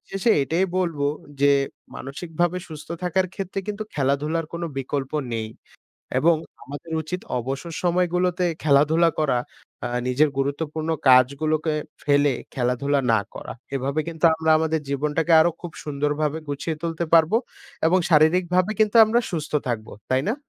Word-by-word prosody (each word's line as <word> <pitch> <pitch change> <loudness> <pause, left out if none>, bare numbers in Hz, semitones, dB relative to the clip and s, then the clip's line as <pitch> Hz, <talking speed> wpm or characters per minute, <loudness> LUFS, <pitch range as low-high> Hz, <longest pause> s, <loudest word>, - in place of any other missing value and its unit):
শেষে 195 +4 +1
এটাই 165 +7 +1
বলবো 165 -6 0 0.3
যে, 140 0 +5 0.5
মানসিকভাবে 165 +5 -2
সুস্থ 155 -2 -10
থাকার 185 +1 +1
ক্ষেত্রে 195 0 -4
কিন্তু 210 +1 -3
খেলাধুলার 150 +4 0
কোনো 170 0 -3
বিকল্প 135 0 -3 0.2
নেই। 110 -1 -3 0.7
এবং 165 +4 +4 0.3
আমাদের 145 +4 -9
উচিত 180 +4 -5 0.2
অবসর 135 +7 -5
সময়গুলোতে 180 0 +1 0.2
খেলাধুলা 155 +3 +4
করা। 140 -5 +2 0.5
আ - - 0 0.2
নিজের 140 +4 +3
গুরুত্বপূর্ণ 150 +3 -2 0.2
কাজগুলোকে 150 +5 +4 0.3
ফেলে 145 -1 +3 0.2
খেলাধুলা 135 +3 0
না 110 - +4 0.2
করা। - - -7 0.2
এভাবে 135 +3 -1
কিন্তু 165 0 -1
আমরা 160 0 +1
আমাদের 160 0 0
জীবনটাকে 150 +4 0
আরও 170 +2 +3
খুব 175 - -7
সুন্দরভাবে 150 +1 -1
গুছিয়ে 145 +3 -3
তুলতে 170 0 -2
পারবো 165 +6 +5 0.5
এবং 185 +3 +4
শারীরিকভাবে 180 +4 +3
কিন্তু 215 +1 +2
আমরা 225 +2 +2
সুস্থ 160 -4 -4 0.2
থাকবো 110 -3 -3 0.2
তাই 130 0 +2
না? - - +2
155 Hz, 140 wpm, -23 LUFS, 140-170 Hz, 0.7 s, যে